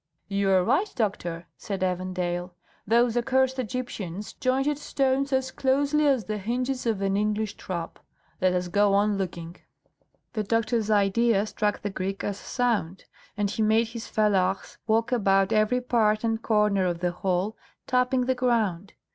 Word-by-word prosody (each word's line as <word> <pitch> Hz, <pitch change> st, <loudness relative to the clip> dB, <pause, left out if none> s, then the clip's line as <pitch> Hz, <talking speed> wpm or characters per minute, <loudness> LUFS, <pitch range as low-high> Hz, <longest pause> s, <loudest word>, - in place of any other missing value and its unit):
"You 200 Hz, 0 st, 0 dB
are 190 Hz, -1 st, +4 dB
right, 315 Hz, -, +1 dB
doctor," 175 Hz, -7 st, -2 dB
said 195 Hz, -2 st, -5 dB
Evandale; 180 Hz, -1 st, -2 dB, 0.3 s
"those 235 Hz, +1 st, +3 dB
accursed 260 Hz, +2 st, +1 dB
Egyptians 215 Hz, -6 st, -5 dB
jointed 270 Hz, +3 st, 0 dB
stones 275 Hz, -1 st, 0 dB
as 265 Hz, 0 st, 0 dB
closely 285 Hz, +3 st, +2 dB
as 265 Hz, -5 st, +2 dB
the 215 Hz, +1 st, -3 dB
hinges 250 Hz, +4 st, -2 dB
of 210 Hz, -4 st, 0 dB
an 195 Hz, 0 st, +1 dB
English 210 Hz, 0 st, 0 dB
trap. 170 Hz, -3 st, -6 dB, 0.4 s
Let 185 Hz, 0 st, +3 dB
us 180 Hz, 0 st, -1 dB
go 200 Hz, +2 st, +3 dB
on 205 Hz, 0 st, +2 dB
looking." 175 Hz, -2 st, -5 dB, 0.8 s
The 215 Hz, -, -1 dB
doctor's 225 Hz, +1 st, 0 dB
idea 210 Hz, +1 st, +3 dB
struck 210 Hz, -1 st, -2 dB
the 205 Hz, -, -2 dB
Greek 195 Hz, +1 st, -4 dB
as 200 Hz, -1 st, -3 dB
sound, 220 Hz, -8 st, -1 dB, 0.3 s
and 205 Hz, -1 st, 0 dB
he 220 Hz, -, -2 dB
made 220 Hz, +1 st, +3 dB
his 230 Hz, 0 st, -7 dB
fellahs 195 Hz, -3 st, 0 dB
walk 225 Hz, +2 st, +2 dB
about 195 Hz, -5 st, +3 dB
every 215 Hz, +4 st, +2 dB
part 220 Hz, -3 st, +2 dB
and 225 Hz, 0 st, 0 dB
corner 210 Hz, -4 st, +2 dB
of 175 Hz, -1 st, -3 dB
the 175 Hz, -1 st, +1 dB
hall, 185 Hz, +4 st, -1 dB, 0.3 s
tapping 250 Hz, 0 st, +1 dB
the 260 Hz, -, +2 dB
ground. 220 Hz, -8 st, 0 dB
215 Hz, 155 wpm, -26 LUFS, 195-245 Hz, 0.8 s, are